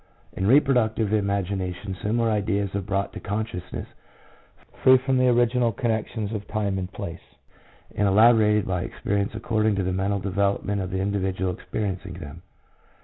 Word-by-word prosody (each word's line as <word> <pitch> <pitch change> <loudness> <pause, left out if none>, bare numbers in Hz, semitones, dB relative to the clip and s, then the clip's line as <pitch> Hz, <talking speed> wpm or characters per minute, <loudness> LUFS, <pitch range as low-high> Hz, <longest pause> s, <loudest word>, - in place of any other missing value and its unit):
In 95 - -1
reproductive 115 -5 +3
imagination 100 -2 -1
similar 115 +2 +1
ideas 100 -2 0
are 100 - -1
brought 100 +1 -2
to - - -6
consciousness 105 -3 -4 1.0
free 130 0 +7
from 130 0 0
the 130 - +4
original 120 0 +3
connections 110 -1 -2
of 105 -2 -5
time 100 -3 -1
and 90 0 -5
place, 85 -3 -6 0.7
and 105 - +2
elaborated 105 0 +5
by 90 -2 -1
experience 100 +3 -2
according 110 -1 +1
to 95 - 0
the 90 0 -1
mental 100 +2 0
development 100 +1 0
of 90 - -4
the 95 - -3
individual 95 -2 -1
experiencing 95 -2 -4
them. 85 -1 -9
100 Hz, 145 wpm, -25 LUFS, 95-110 Hz, 1.0 s, free